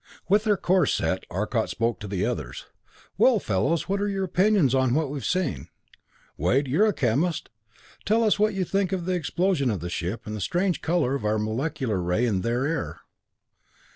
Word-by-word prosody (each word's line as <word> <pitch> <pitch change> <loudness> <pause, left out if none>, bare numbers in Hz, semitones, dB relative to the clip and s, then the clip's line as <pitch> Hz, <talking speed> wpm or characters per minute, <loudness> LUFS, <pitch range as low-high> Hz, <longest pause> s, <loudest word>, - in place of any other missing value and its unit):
With 205 +4 +3
their 210 -2 +3
course 180 -4 +2
set, 95 - -2
Arcot 105 +5 -1
spoke 115 +1 -1
to 105 - -7
the 95 -2 -1
others. - - -4 0.5
"Well, - - +5
fellows, 155 - 0
what 200 +1 -1
are 205 - 0
your 195 -1 -1
opinions 185 - +3
on 130 -1 +2
what 155 -3 0
we've 145 -2 -5
seen? 185 -5 -1 0.7
Wade, 125 - +1
you're 170 +12 +3
a - - +3
chemist 145 - 0 0.5
tell 225 +3 +2
us 210 -2 +2
what 215 -1 +2
you 190 -1 0
think 195 +2 0
of 180 -3 -2
the 185 - 0
explosion 175 -3 0
of 105 -5 -1
the 85 +2 -5
ship, 90 +7 -3
and 105 - -6
of - - -4
the - - -6
strange 180 - 0
color 165 -6 +1
of 140 - -3
our 105 +1 +1
molecular 110 - -2
ray 90 +7 +1
in 100 -6 0
their 120 +5 0
air." 160 -1 -3
145 Hz, 200 wpm, -25 LUFS, 110-185 Hz, 0.7 s, Well